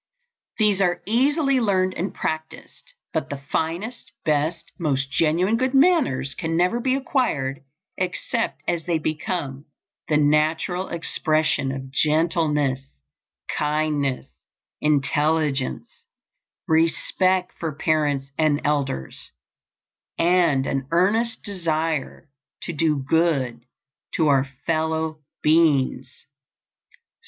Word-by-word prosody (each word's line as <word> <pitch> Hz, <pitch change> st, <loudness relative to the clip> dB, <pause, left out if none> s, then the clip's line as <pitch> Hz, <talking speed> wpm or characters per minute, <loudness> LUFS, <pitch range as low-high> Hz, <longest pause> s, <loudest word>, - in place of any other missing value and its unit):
These 210 Hz, -3 st, +2 dB
are 175 Hz, -2 st, +2 dB
easily 275 Hz, -, +2 dB
learned 185 Hz, -5 st, +1 dB
and 180 Hz, +2 st, -3 dB
practiced; 160 Hz, -, -6 dB, 0.2 s
but -, -, -2 dB
the 140 Hz, -, -4 dB
finest, 180 Hz, +10 st, -3 dB
best, 155 Hz, +2 st, 0 dB
most 140 Hz, -4 st, -1 dB
genuine 170 Hz, +8 st, +2 dB
good 260 Hz, +2 st, 0 dB
manners 270 Hz, -, +3 dB
can 165 Hz, 0 st, -2 dB
never 180 Hz, +7 st, +2 dB
be 260 Hz, +2 st, +1 dB
acquired 230 Hz, -, -1 dB, 0.4 s
except 185 Hz, +5 st, -2 dB
as 170 Hz, -2 st, -1 dB
they 170 Hz, -2 st, +2 dB
become 155 Hz, -2 st, -3 dB, 0.4 s
the 150 Hz, -, +3 dB
natural 155 Hz, +5 st, +1 dB
expression 155 Hz, -4 st, 0 dB
of 135 Hz, 0 st, -6 dB
gentleness, 150 Hz, -3 st, +1 dB, 0.8 s
kindness 150 Hz, -3 st, 0 dB, 0.6 s
intelligence, 150 Hz, -1 st, 0 dB, 0.7 s
respect 180 Hz, +3 st, +2 dB
for 165 Hz, -2 st, -2 dB
parents 145 Hz, -3 st, 0 dB
and 155 Hz, -2 st, +3 dB
elders, 140 Hz, -, -2 dB, 0.8 s
and 170 Hz, -6 st, +3 dB
an 135 Hz, -1 st, -2 dB
earnest 210 Hz, +7 st, +2 dB
desire 165 Hz, -5 st, -2 dB, 0.4 s
to 170 Hz, -, -4 dB
do 155 Hz, -1 st, +1 dB
good 140 Hz, -8 st, +1 dB, 0.5 s
to 160 Hz, -3 st, +3 dB
our 135 Hz, -1 st, +4 dB, 0.2 s
fellow 160 Hz, -1 st, -1 dB, 0.2 s
beings. 145 Hz, -6 st, +2 dB
160 Hz, 100 wpm, -23 LUFS, 145-180 Hz, 0.8 s, our